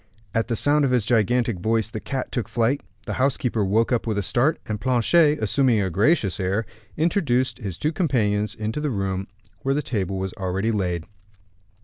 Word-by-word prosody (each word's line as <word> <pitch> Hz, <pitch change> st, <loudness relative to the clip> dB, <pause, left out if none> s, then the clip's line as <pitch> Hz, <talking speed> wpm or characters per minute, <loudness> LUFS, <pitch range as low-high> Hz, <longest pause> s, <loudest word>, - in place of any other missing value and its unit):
At 115 Hz, -, 0 dB
the 120 Hz, -, -1 dB
sound 145 Hz, +6 st, +4 dB
of 135 Hz, -, +2 dB
this 125 Hz, -4 st, +1 dB
gigantic 115 Hz, -2 st, +1 dB
voice, 110 Hz, +2 st, 0 dB
the 110 Hz, -, -4 dB
cat 130 Hz, +3 st, -4 dB
took 120 Hz, -6 st, -3 dB
flight, 120 Hz, +4 st, +1 dB, 0.2 s
the -, -, -3 dB
housekeeper 125 Hz, -5 st, +1 dB
woke 110 Hz, +5 st, +1 dB
up 120 Hz, -1 st, 0 dB
with 110 Hz, -2 st, -1 dB
a 100 Hz, -, 0 dB
start, 130 Hz, -, +2 dB
and 105 Hz, -1 st, -4 dB
Planchet, 145 Hz, +5 st, +3 dB
assuming 115 Hz, +2 st, +2 dB
a 95 Hz, -2 st, -1 dB
gracious 105 Hz, -, +2 dB
air, 100 Hz, +4 st, 0 dB, 0.3 s
introduced 145 Hz, -7 st, +1 dB
his 100 Hz, -7 st, -5 dB
two 155 Hz, -, 0 dB
companions 110 Hz, -, 0 dB
into 110 Hz, +7 st, -3 dB
the 150 Hz, -, -1 dB
room, 95 Hz, -4 st, -2 dB, 0.3 s
where 135 Hz, +6 st, 0 dB
the 150 Hz, -, -1 dB
table 100 Hz, -6 st, -2 dB
was 95 Hz, +2 st, -3 dB
already 95 Hz, +1 st, -1 dB
laid. 90 Hz, -6 st, -1 dB
115 Hz, 190 wpm, -23 LUFS, 100-130 Hz, 0.3 s, sound